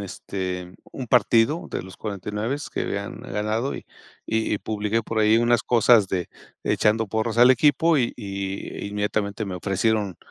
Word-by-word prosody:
este 90 -2 -5 0.2
un 130 - -6
partido 125 +7 +3
de - - -3
los 95 0 -12
49s 105 +5 -3 0.2
que - - -3
habían - - -4
ganado 110 +5 -2
y - - -8 0.4
y 110 -1 0
y - - 0
publiqué 105 +2 -2
por 110 0 -3
ahí 110 +1 +5
unas 120 0 +3
cosas 115 -4 +4
de 90 -2 -2 0.3
echando 110 +1 +2
porras 110 +2 -2
al 125 +2 +7
equipo 150 +4 +4
y 120 - 0
y 100 0 -5
inmediatamente 105 +1 -2
me 95 -2 -5
ofrecieron 100 0 0
110 Hz, 155 wpm, -24 LUFS, 100-115 Hz, 0.4 s, al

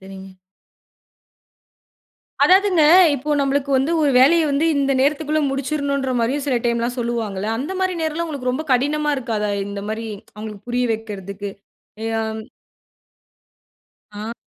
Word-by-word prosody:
சரிங்க. 190 0 -11 2.1
அதாவதுங்க 375 -3 +4 0.3
இப்போ 285 +3 -4
நம்மளுக்கு 280 0 0
வந்து 270 +4 +1
ஒரு 290 - +3
வேலைய 320 +5 +5
வந்து 285 +4 +1
இந்த 275 -1 +1
நேரத்துக்குள்ள 305 +2 +1
முடிச்சுர்ணுன்ற 280 -1 -1
மாரியும் 265 +5 -1
சில 260 -3 +1
டைம்லாம் 235 +1 0
சொல்லுவாங்கல்ல! 220 -4 -2
அந்த 290 +9 -4
மாரி 375 -1 0
நேரலாம் 320 +1 -1
உங்களுக்கு 280 -5 -3
ரொம்ப 300 +5 -3
கடினமா 295 +4 +1
இருக்காதா? 220 -5 -2 0.2
இந்தமாரி 210 +3 -5 0.3
அவுங்களுக்கு 210 0 -9
புரிய 245 +1 0
வைக்கிறதுக்கு, 200 -2 -6 0.5
ஏ - - -2 0.2
அம் 220 0 -4 1.7
ஆ. 215 +2 -5
260 Hz, 120 wpm, -20 LUFS, 220-290 Hz, 2.1 s, வேலைய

